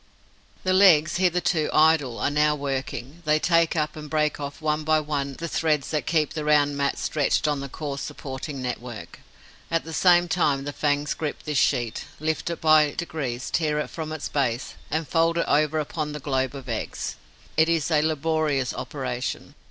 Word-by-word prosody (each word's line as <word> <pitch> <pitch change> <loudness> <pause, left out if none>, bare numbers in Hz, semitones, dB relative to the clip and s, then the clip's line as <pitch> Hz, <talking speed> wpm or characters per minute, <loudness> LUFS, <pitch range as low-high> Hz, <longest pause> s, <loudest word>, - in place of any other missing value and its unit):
The 185 - +2
legs, 170 -5 +5
hitherto 175 -3 +1
idle, 155 -6 +3
are - - 0
now 150 0 +3
working. 140 +2 -4
They 150 0 +4
take 165 +1 +2
up 150 -1 -1
and 150 -1 -8
break 150 -1 0
off 140 0 -6
one 155 -1 -1
by 155 0 +3
one 145 -2 -2
the 165 +5 -5
threads 155 -3 0
that 155 -2 -1
keep 155 -3 +1
the 155 - -3
round 145 -1 +3
mat 140 0 0
stretched 150 0 0
on 145 -2 0
the 140 0 -6
coarse 140 -1 -5
supporting 135 -1 -6
network. 120 -3 -6 0.5
At 165 0 0
the 160 - -8
same 175 0 +5
time, 150 -5 +1
the 145 +1 -5
fangs 145 0 0
grip 155 -2 -4
this 150 -3 0
sheet, 120 -5 0
lift 160 +2 -1
it 170 - -4
by 155 -2 +5
degrees, 135 -8 -4
tear 155 -2 +1
it 150 - -3
from 155 -1 -5
its 155 -2 -4
base 125 -4 -1 0.2
and 160 0 -1
fold 165 0 +2
it 170 - +1
over 155 +1 +2
upon 150 0 -3
the 150 - -5
globe 130 -1 -1
of 135 -2 -9
eggs. - - -4 0.4
It 160 +1 +4
is 165 -1 +1
a 150 -1 +4
laborious 155 -3 0
operation. 125 -4 -4
150 Hz, 185 wpm, -25 LUFS, 140-160 Hz, 0.5 s, legs